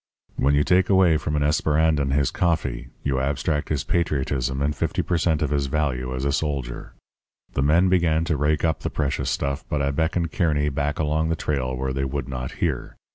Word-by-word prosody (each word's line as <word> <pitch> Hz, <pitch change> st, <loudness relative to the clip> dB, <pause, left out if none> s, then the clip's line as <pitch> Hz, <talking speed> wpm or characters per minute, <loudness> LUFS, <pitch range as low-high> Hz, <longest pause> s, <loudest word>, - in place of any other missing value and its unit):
_ -, -, -1 dB
When 70 Hz, +2 st, +4 dB
you 75 Hz, -, +3 dB
take 90 Hz, +2 st, +3 dB
away 95 Hz, -5 st, +5 dB
from 75 Hz, 0 st, -3 dB
an 75 Hz, -, +1 dB
Esperandan 75 Hz, -1 st, +2 dB
his 70 Hz, -1 st, +2 dB
coffee, 80 Hz, -8 st, -1 dB
you 70 Hz, -2 st, 0 dB
abstract 75 Hz, +2 st, -1 dB
his 75 Hz, -3 st, -1 dB
patriotism 70 Hz, -5 st, -1 dB
and 70 Hz, +1 st, 0 dB
50 -, -, -1 dB
per 90 Hz, -, -1 dB
cent. 80 Hz, -2 st, +1 dB
of 75 Hz, -, -1 dB
his 70 Hz, -1 st, 0 dB
value 65 Hz, -4 st, -1 dB
as 65 Hz, +2 st, -3 dB
a 70 Hz, -, +2 dB
soldier. 70 Hz, -5 st, -3 dB, 0.6 s
The -, -, 0 dB
men 80 Hz, +6 st, +4 dB
began 85 Hz, -3 st, +2 dB
to 80 Hz, -, 0 dB
rake 75 Hz, +2 st, +1 dB
up 80 Hz, -, 0 dB
the -, -, -3 dB
precious 70 Hz, -2 st, -1 dB
stuff; 70 Hz, +2 st, -2 dB
but 75 Hz, -, 0 dB
I 70 Hz, 0 st, +1 dB
beckoned 80 Hz, +3 st, 0 dB
Kearny 75 Hz, -5 st, +1 dB
back 70 Hz, +1 st, -2 dB
along 80 Hz, +1 st, 0 dB
the 80 Hz, -, +1 dB
trail 65 Hz, -5 st, -2 dB
where 65 Hz, +1 st, -2 dB
they 70 Hz, +1 st, -1 dB
would 70 Hz, -1 st, -3 dB
not 65 Hz, -1 st, -5 dB
hear. -, -, -2 dB
75 Hz, 210 wpm, -24 LUFS, 70-80 Hz, 0.6 s, away